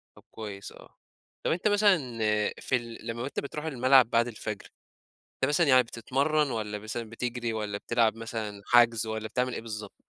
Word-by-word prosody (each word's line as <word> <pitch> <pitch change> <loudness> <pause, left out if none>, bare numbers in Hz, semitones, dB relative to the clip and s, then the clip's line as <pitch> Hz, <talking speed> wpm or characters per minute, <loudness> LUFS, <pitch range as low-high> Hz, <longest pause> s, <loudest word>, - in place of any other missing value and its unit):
طب - - -17
كويس 100 -3 -7
آه. - - -16 0.5
طب - - +2
أنت 175 +6 +1
مثلًا 205 -2 +5 0.6
في - - 0
ال 115 -2 -5
لمّا 115 +1 -3
أنت 140 - -3
بتروح 150 +2 -6
الملعب 130 -3 +5
بعد 115 +1 +3
الفجر، 110 -2 -5 0.7
أنت - - 0
مثلًا 160 +2 +3
يعني 130 -2 +6
بتتمرّن 140 +5 0
والّا 105 -2 -3
مثلًا 110 +1 -5
بتجري 120 0 -3
والّا 105 -2 -3
بتلعب 115 0 +1
مثلًا 110 -3 -5
حَجْز، 115 -2 +4
والّا 110 0 -3
بتعمل 125 +1 -1
إيه - - -4
بالضبط؟ 110 -2 -8
115 Hz, 170 wpm, -28 LUFS, 110-130 Hz, 0.7 s, يعني